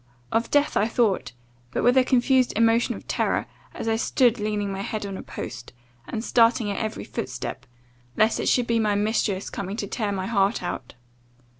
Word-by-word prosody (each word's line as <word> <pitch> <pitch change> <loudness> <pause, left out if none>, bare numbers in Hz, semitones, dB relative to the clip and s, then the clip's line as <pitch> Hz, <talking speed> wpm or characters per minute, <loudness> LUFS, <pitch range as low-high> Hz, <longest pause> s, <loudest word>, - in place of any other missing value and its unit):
Of 230 +1 +1
death 290 0 +2
I 210 - +3
thought, 225 - +1 0.4
but - - -2
with 245 +1 +5
a 260 - +6
confused 255 0 +3
emotion 230 +2 +3
of - - -11
terror, - - 0 0.3
as - - -6
I 225 0 +2
stood 240 0 +2
leaning 210 -1 -1
my 195 0 -4
head 210 +1 -3
on 195 -1 -5
a - - -6
post, 120 - -8 0.3
and 220 - -4
starting 230 -3 +3
at 200 - -3
every 215 0 -3
footstep, - - -5 0.5
lest 220 +1 +3
it - - +1
should 245 - +3
be 235 -1 +1
my 210 -2 +2
mistress 205 -2 0
coming 195 +2 -4
to 215 - -2
tear 210 0 -2
my 190 -1 -2
heart 200 -1 +1
out. 130 -9 -5
220 Hz, 190 wpm, -25 LUFS, 200-235 Hz, 0.5 s, a